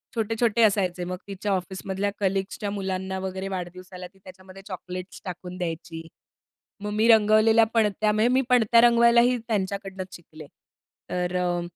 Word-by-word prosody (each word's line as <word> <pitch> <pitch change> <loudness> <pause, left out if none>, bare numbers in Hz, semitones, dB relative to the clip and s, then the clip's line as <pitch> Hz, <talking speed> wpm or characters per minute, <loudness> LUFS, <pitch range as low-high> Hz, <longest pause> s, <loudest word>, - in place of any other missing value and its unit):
छोटे-छोटे 225 +1 0
असायचे, 190 -4 +1
मग 180 0 -4
तिच्या 200 +1 -4
ऑफिसमधल्या 190 +2 -2
कलीग्सच्या 195 +1 -2
मुलांना 190 -1 -3
वगैरे, 190 0 -4
वाढदिवसाला 180 0 -7
ती 195 - -25
त्याच्यामध्ये 185 +1 -13
चॉकलेट्स 185 0 -8
टाकून 180 0 -7
द्यायची. 165 -1 -5 0.8
मग 210 - -3
मी 220 +2 +2
रंगवलेल्या 220 0 +5
पणत्या 215 -1 +2
म्हणजे 220 +3 +2
मी 265 - +4
पणत्या 235 -1 +5
रंगवायलाही 235 +1 +5
त्यांच्याकडनंच 195 -3 -3
शिकले. 155 -3 -13 0.6
तर 180 0 -2
अ, 175 -1 -1
195 Hz, 135 wpm, -25 LUFS, 185-215 Hz, 0.8 s, रंगवलेल्या